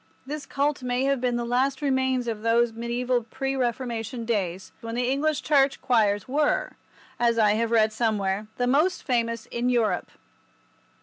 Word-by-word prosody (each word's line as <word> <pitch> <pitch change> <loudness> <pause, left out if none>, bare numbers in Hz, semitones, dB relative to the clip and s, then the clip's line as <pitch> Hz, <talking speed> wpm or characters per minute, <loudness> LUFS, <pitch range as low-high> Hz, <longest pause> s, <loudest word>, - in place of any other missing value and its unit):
This 290 +1 -6
cult 285 0 0
may 250 +1 -1
have 275 -2 +1
been 250 -1 +1
the 240 0 -2
last 260 +3 +1
remains 260 -3 0
of 220 -2 -3
those 230 +1 +2
mediaeval 240 +1 -1
pre 270 +3 -2
Reformation 235 -2 -2
days 190 -5 -2
when 230 0 -5
the 245 0 0
English 285 +3 0
Church 275 -2 +3
choirs 210 -4 +2
were, 290 +3 +1 0.5
as 235 -1 +2
I 215 -2 +4
have 225 +2 0
read 220 -1 +3
somewhere, 210 -3 0
the 245 - +1
most 300 +9 +2
famous 230 -3 -1
in 240 +1 0
Europe. 235 -3 +1
240 Hz, 165 wpm, -25 LUFS, 230-265 Hz, 0.5 s, I